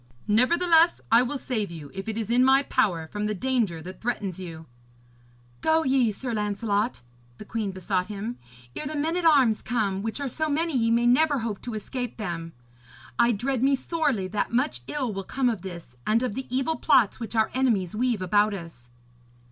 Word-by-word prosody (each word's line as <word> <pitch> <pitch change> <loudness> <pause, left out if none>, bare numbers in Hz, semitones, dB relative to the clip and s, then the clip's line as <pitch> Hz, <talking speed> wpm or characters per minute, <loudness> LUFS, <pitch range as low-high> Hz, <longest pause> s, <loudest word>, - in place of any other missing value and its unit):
Nevertheless, 330 +9 +4
I 230 +1 +7
will 255 +3 -1
save 225 -6 -2
you, 155 -4 -9
if 195 +3 -5
it 220 - -3
is 225 0 -2
in 245 +1 +4
my 265 +1 +5
power, 180 - 0
from 210 0 -3
the 210 - -2
danger 215 -8 -1
that 185 +2 -9
threatens 205 -6 -3
you.' 165 -3 -8 1.0
'Go 320 0 +3
ye, 260 -5 +3
Sir 240 +4 -5
Lancelot,' 210 - -1 0.3
the - - -10
queen 220 -1 -3
besought 185 0 -2
him, 215 +3 -5 0.4
'ere 300 - -3
the 305 - -4
men 315 +3 0
at 355 -1 -1
arms 265 -9 +5
come, 205 -5 -1
which 225 +4 -4
are 280 - -2
so 310 +5 -2
many 320 +1 0
ye 230 -2 +2
may 235 +1 +3
never 285 +4 +4
hope 225 -4 -3
to 240 -3 -5
escape 245 +3 -5
them. 170 -6 -5 0.7
I 235 0 +5
dread 245 +3 -1
me 275 +1 +4
sorely 275 - -1
that 210 - -1
much 235 - 0
ill 260 -7 -2
will 195 0 -4
come 255 +4 0
of 215 -6 -5
this, 170 -9 -9
and 225 +3 +3
of 250 - -1
the 265 +4 -5
evil 270 +6 0
plots 245 -9 +3
which 230 -1 -6
our 220 -1 +2
enemies 220 -9 +1
weave 235 -4 0
about 205 +3 +2
us.' 165 -10 -11
230 Hz, 195 wpm, -26 LUFS, 200-260 Hz, 1.0 s, I